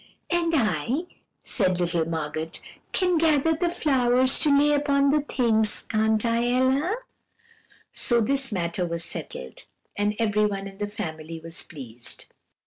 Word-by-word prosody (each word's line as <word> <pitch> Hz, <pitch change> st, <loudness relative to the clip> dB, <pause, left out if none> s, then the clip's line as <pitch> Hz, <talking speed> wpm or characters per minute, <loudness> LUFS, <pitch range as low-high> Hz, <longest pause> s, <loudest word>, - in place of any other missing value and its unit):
"'And 345 Hz, -1 st, +1 dB
I,' 225 Hz, -, +1 dB, 0.4 s
said 185 Hz, -5 st, +1 dB
little 170 Hz, -2 st, +1 dB
Margot, 160 Hz, 0 st, -3 dB, 0.4 s
'can 360 Hz, -3 st, +2 dB
gather 320 Hz, -1 st, +3 dB
the 345 Hz, +2 st, 0 dB
flowers 260 Hz, -5 st, +3 dB
to 305 Hz, -, +4 dB
lay 295 Hz, +1 st, +4 dB
upon 280 Hz, -1 st, +2 dB
the 300 Hz, 0 st, +3 dB
things 225 Hz, -6 st, +1 dB
can't 220 Hz, 0 st, +1 dB
I, 235 Hz, +1 st, +1 dB
Ella?' 265 Hz, -, +2 dB, 1.0 s
"So 240 Hz, -1 st, +2 dB
this 265 Hz, +2 st, +1 dB
matter 175 Hz, -2 st, -1 dB
was 170 Hz, -1 st, -2 dB
settled, 65 Hz, -, -6 dB, 0.3 s
and 205 Hz, +1 st, 0 dB
everyone 210 Hz, -3 st, 0 dB
in 195 Hz, 0 st, -12 dB
the 205 Hz, -, -1 dB
family 165 Hz, -6 st, -6 dB
was 165 Hz, +1 st, -6 dB
pleased. 120 Hz, -6 st, -9 dB
220 Hz, 135 wpm, -25 LUFS, 175-275 Hz, 1.0 s, to